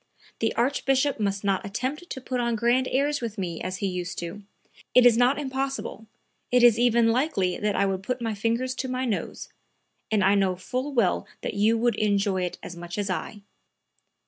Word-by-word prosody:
The 225 - +1
Archbishop 270 +2 +1
must 200 -1 -1
not 195 -2 +1
attempt 260 - -4
to - - -5
put 255 -1 -3
on 235 -1 0
grand 240 +3 +2
airs 285 +2 +1
with 230 -2 -4
me 175 -4 -4
as 185 0 -3
he 200 - -3
used 180 -2 -3
to; 175 +4 -5 0.5
it 250 -1 +7
is 240 -2 +7
not 245 +3 +3
impossible, 270 -5 -4 0.4
it 250 0 +4
is 235 -2 +6
even 235 -1 +4
likely 230 - +1
that 210 -1 0
I 200 - +2
would 190 -1 -1
put 250 +6 -3
my 225 -2 -2
fingers 230 +5 -1
to 260 - -2
my 255 0 -2
nose, 220 -5 -3 0.6
and 215 -3 +2
I 195 +2 +5
know 195 -2 +2
full 255 +10 -4
well 230 -9 +1
that - - -3
you 215 +3 +3
would 240 +1 +2
enjoy 200 -2 +1
it 175 - -5
as 175 - -7
much 175 +1 -7
as 200 -2 -1
I." 205 +2 -4
225 Hz, 200 wpm, -26 LUFS, 195-255 Hz, 0.6 s, it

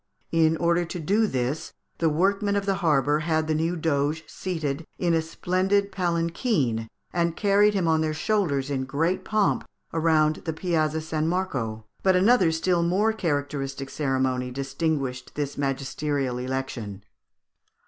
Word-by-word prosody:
In 160 -1 +3
order 170 +1 +2
to 175 +1 -5
do 205 +8 +2
this, 130 0 -2 0.3
the 165 - +3
workmen 195 +5 +1
of 200 -1 0
the 195 - +2
harbour 150 -3 +3
had 155 0 0
the 155 - 0
new 165 +3 0
Doge 155 -1 0
seated 160 -5 -3
in 175 -2 +1
a 165 - +3
splendid 190 +5 0
palanquin, 170 - 0 0.3
and 170 -1 0
carried 205 0 +4
him 185 -4 +1
on 160 -1 +3
their 155 -1 -1
shoulders 155 -7 0
in 130 -1 -1
great 160 +7 0
pomp 215 -1 +1 0.3
round 155 -1 +3
the 160 - -4
Piazza 160 -2 0
San 155 0 -1
Marco. 130 - -2 0.2
But 190 -1 +4
another 190 -2 +5
still 170 +2 +1
more 195 +6 +2
characteristic 145 -6 -2
ceremony 130 -3 0
distinguished 135 -1 -2
this 145 -1 -2
magisterial 135 -1 -2
election. 125 -6 -4
160 Hz, 145 wpm, -25 LUFS, 140-180 Hz, 0.3 s, another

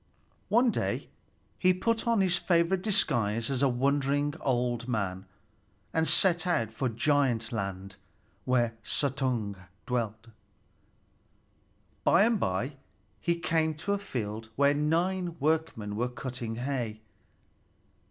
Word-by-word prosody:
One 235 +2 +4
day - - -2 0.5
he 185 0 +4
put 230 +4 0
on 230 -3 +3
his 185 -2 +3
favorite 175 +1 +2
disguise 120 - +1
as 130 -1 -1
a 140 - +4
wandering 140 +3 +1
old 120 -2 0
man, 95 -5 -2 0.7
and 160 0 +2
set 175 -2 +4
out 115 -11 +1
for 125 +3 -1
Giant 120 -2 +1
Land, 95 -3 -4 0.5
where 120 -2 +2
Suttung 125 -7 -1 0.3
dwelt. 115 -2 -3 1.7
By 175 - +5
and 225 -1 +2
by 125 - -1 0.4
he 170 0 +1
came 160 -2 +1
to 160 +7 -2
a 200 - 0
field 110 - -5
where 140 +2 +4
nine 170 +4 0
workmen 150 -9 0
were 120 +3 0
cutting 125 -2 -5
hay. 120 -4 -3
135 Hz, 120 wpm, -29 LUFS, 115-170 Hz, 1.7 s, By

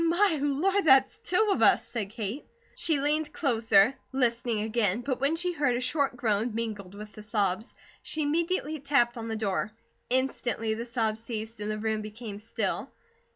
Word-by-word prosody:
"My 340 0 +3
Lord! 345 +8 +1
THERE'S 270 +7 +5
TWO 420 +1 +2
OF - - +1
US!" - - +5
said 210 -5 -3
Kate. 220 +5 -5 0.3
She 315 -4 0
leaned 300 +2 0
closer, 225 - +3 0.2
listening 235 -4 0
again, 220 -1 +1
but 255 0 -3
when 280 +4 +3
she 355 +1 -1
heard 290 -6 +1
a - - -1
short 255 +1 0
groan 220 -1 0
mingled 210 -4 -4
with 210 +1 -9
the 215 - -10
sobs, 210 0 -1 0.3
she 310 - -2
immediately 315 0 0
tapped 270 -4 +2
on 230 -1 -5
the 225 - -2
door. 210 -1 -1 0.4
Instantly 245 -3 0
the 230 +2 -5
sobs 225 -2 -1
ceased 225 -1 -6
and 210 0 -3
the 215 - -2
room 220 0 -1
became 215 -1 -7
still. 225 +2 -2
240 Hz, 175 wpm, -28 LUFS, 215-290 Hz, 0.4 s, THERE'S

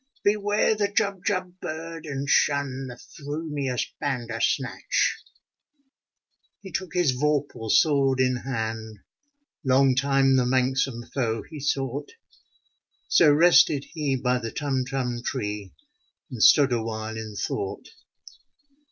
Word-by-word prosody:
Beware 205 +1 +2
the 210 -1 0
Jubjub 195 -3 -1
bird, 165 0 -6
and 140 -1 -4
shun 135 -2 +1
The 125 - -8
f - - -17 0.2
rumious 145 -4 -2
Bandersnatch! 125 -1 -1 0.7
" 270 - -48
He 190 - -9
took 185 -3 -4
his 175 -6 +3
vorpal 145 -4 -1
sword 135 -1 +3
in 130 -1 +2
hand: 110 -4 -5 0.6
Long 135 0 +4
time 135 0 +3
the 125 - +2
manxome 130 -1 0
foe 115 -4 -1
he 155 -2 -10
sought. 135 - -2 1.0
So 155 -4 +6
rested 150 -2 +5
he 150 -5 -1
by 125 0 0
the 115 -2 -5
Tumtum 130 -3 -2
tree. 105 -7 -4 0.6
And 120 -4 -6
stood 140 +1 +6
awhile 110 -1 -3
in 110 -1 -7
thought. 400 - -4
135 Hz, 115 wpm, -25 LUFS, 125-150 Hz, 1.0 s, So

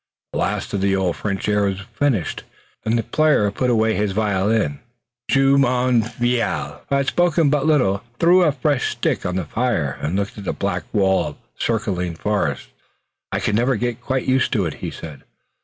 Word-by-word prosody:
The - - -2
last - - -2
of 100 - -1
the 100 0 +2
old 95 -3 0
French 100 -1 -3
airs 100 -2 +1
was 100 - -9
finished, 125 - 0 0.4
and 115 +2 +1
the 115 - 0
player 150 -7 +2
put 125 +5 -1
his 110 -3 +1
violin 105 +1 +1
away. 70 -7 -2 0.5
Jumonville, 125 -3 +1
who 140 - +2
had 140 0 +1
spoken 165 -1 +2
but 150 0 +1
little, 100 -11 +2 0.2
threw 175 +5 +5
a 160 -4 +4
fresh 140 -1 0
stick - - -1
on 90 - -2
the 95 -3 -1
fire 85 - -1
and 80 +5 -2
looked 100 +1 -2
at 100 - -8
the - - -1
black 90 -4 -2
wall 95 -3 +2
of - - -7 0.2
circling 95 -7 -1
forest. 105 - -1 0.6
"I - - 0
can 105 - 0
never 125 +4 +2
get 120 +1 -2
quite 130 0 -1
used 130 0 +2
to 100 -7 +1
it," 80 - -2
he - - -3
said. 75 -4 -9
110 Hz, 185 wpm, -21 LUFS, 95-130 Hz, 0.6 s, threw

